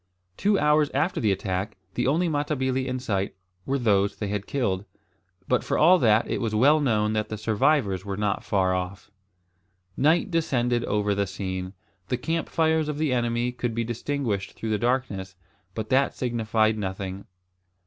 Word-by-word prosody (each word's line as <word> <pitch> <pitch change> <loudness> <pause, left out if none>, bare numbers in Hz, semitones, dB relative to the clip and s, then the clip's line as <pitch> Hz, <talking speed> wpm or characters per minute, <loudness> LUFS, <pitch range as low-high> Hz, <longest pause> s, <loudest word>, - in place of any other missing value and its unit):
Two 200 0 +2
hours 150 -1 +3
after 160 +7 0
the 110 -3 +3
attack 95 +2 -2 0.2
the - - 0
only 165 +6 +2
Matabili 135 -4 -1
in 130 0 -2
sight 100 -6 -2 0.3
were 135 +1 +1
those 100 -5 +2
they 105 - -4
had 100 -1 -3
killed, 100 -9 -1 0.6
but 125 - +2
for - - -1
all 180 +4 +6
that 110 -3 +3
it - - -2
was 110 -2 -1
well 145 +8 +5
known 110 -6 +1
that 110 0 -1
the 110 - -4
survivors 110 -2 +1
were 100 -1 -4
not 105 -1 -1
far 95 -2 +1
off. 95 +2 -4 0.8
Night 160 +7 +2
descended 125 -7 +1
over 105 0 +1
the 100 0 0
scene. 95 0 -4 0.3
The 125 - -1
camp 165 +6 -2
fires 160 -1 +1
of 150 - -3
the 150 -3 +1
enemy 120 0 0
could 120 -2 -3
be 115 - 0
distinguished 115 -4 -2
through 110 - -4
the 105 - +1
darkness; 110 -6 -1 0.4
but 110 -1 -4
that 135 +1 +2
signified 110 -3 +1
nothing. 95 0 -4
115 Hz, 170 wpm, -25 LUFS, 100-140 Hz, 0.8 s, all